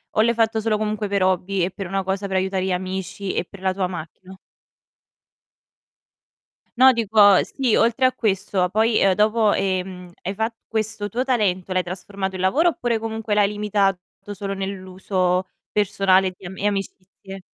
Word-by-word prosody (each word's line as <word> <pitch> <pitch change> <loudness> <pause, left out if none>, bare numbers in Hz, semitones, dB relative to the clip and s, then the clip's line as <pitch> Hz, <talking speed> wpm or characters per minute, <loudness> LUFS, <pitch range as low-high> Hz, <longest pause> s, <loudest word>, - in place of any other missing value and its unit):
o 215 - +4
l'hai 235 +1 +3
fatto 225 -1 +1
solo 220 0 0
comunque 215 -1 -2
per 200 -1 0
hobby 185 0 +1
e - - -2
per 195 +1 -7
una 195 +2 -1
cosa 190 +1 -2
per 190 -1 -1
aiutare 190 0 -1
gli 190 - -1
amici 190 +1 -4
e - - -1
per 200 +1 -14
la 190 0 +1
tua 185 0 -1
macchina? 180 +2 -8 2.4
No, 260 +1 +7
dico, 210 -4 +5
sì, 260 -5 0
oltre 235 +3 +3
a 255 - +3
questo, 190 -3 0
poi, 220 +3 +2
uhm, 195 -1 +4
dopo, 215 +1 +3
ehm, 185 -2 -2
hai 190 - -3
fa 220 +3 -2
questo 215 -1 -2
tuo 245 +5 -1
talento 195 -7 0
l'hai 185 - +1
trasformato 190 +2 -5
in 185 - -4
lavoro 295 - +3
oppure 240 -8 -1
comunque 225 -1 -3
l'hai 205 -1 +4
limitato 205 -2 0 0.4
solo 200 0 -4
nell'uso 185 -1 -2 0.2
personale 190 -2 +2
di 185 - -14
am 190 +2 -8
e 205 - 0
amicizie? 195 -1 -6
195 Hz, 170 wpm, -22 LUFS, 185-215 Hz, 2.4 s, No